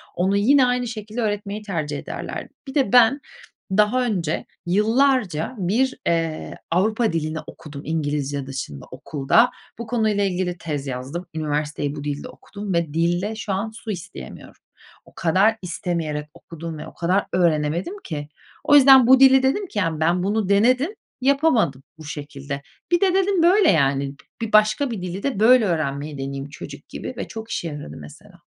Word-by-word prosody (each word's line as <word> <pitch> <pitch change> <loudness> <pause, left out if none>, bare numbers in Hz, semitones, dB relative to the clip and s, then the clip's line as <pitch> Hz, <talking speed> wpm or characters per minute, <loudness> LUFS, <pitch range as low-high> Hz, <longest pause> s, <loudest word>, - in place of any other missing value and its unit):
onu 190 +3 +1
yine 260 +6 +5
aynı 250 0 0
şekilde 220 +1 -5
öğretmeyi 205 -1 -2
tercih 155 -8 -3
ederlerdi. - - -6 0.2
Bir 270 - -8
de 265 -8 +1
ben 245 +3 +6 0.5
daha 210 +6 +3
önce, 175 -8 -1 0.2
yıllarca 215 - +2
bir, 220 +8 0
ııı, 165 -2 -1 0.2
Avrupa 215 +4 +1
dilini 160 -1 -2
okudum 145 -2 -10
İngilizce 145 -3 -2
dışında 130 - -6
okulda. 145 - +2 0.3
Bu 235 - -5
konuyla 220 -4 +1
ilgili 180 -2 -1
tez 145 -5 -4
yazdım. 135 +8 -5
Üniversiteyi 150 -1 -2
bu 145 - -6
dilde 145 -1 -4
okudum 200 -1 -7
ve 170 -3 0
dilde 175 +6 0
şu 210 -2 -3
an 200 +4 -2
su 220 0 -7
isteyemiyorum. 160 - -9 0.4
O - - -20
kadar 195 +7 +3
istemeyerek 165 -4 -3
okudum 165 -1 -8
ve - - -8
o - - -12
kadar 180 +4 +1
öğrenemedim 170 - +1
ki. 150 -3 -5 0.3
O 290 - +5
yüzden 265 -3 +8
bu 260 +1 +7
dili 265 0 +7
dedim 385 +10 +1
ki 220 - -3
yani 165 -5 -1
ben 175 +3 +2
bunu 205 0 0
denedim, 255 - +3 0.3
yapamadım 260 - +2
bu 160 - -11
şekilde. 140 -2 -6 0.3
Bir 345 - +3
de, 380 -2 +3
dedim, 380 -2 +2
böyle 375 +3 +5
yani, 140 -4 +1
bi 140 - -16 0.3
bir 215 - -14
başka 215 +5 +4
bir 215 -5 -4
dili 185 +2 -5
de 275 -8 -1
böyle 235 +1 +6
öğrenmeyi 150 -4 -2
deneyeyim 135 +1 -5
çocuk - - -10
gibi - - -6
ve - - -4
çok 225 -1 -8
işe 170 - -2
yaradı 145 - -7
mesela. 75 -1 -14
185 Hz, 165 wpm, -22 LUFS, 150-225 Hz, 0.5 s, yüzden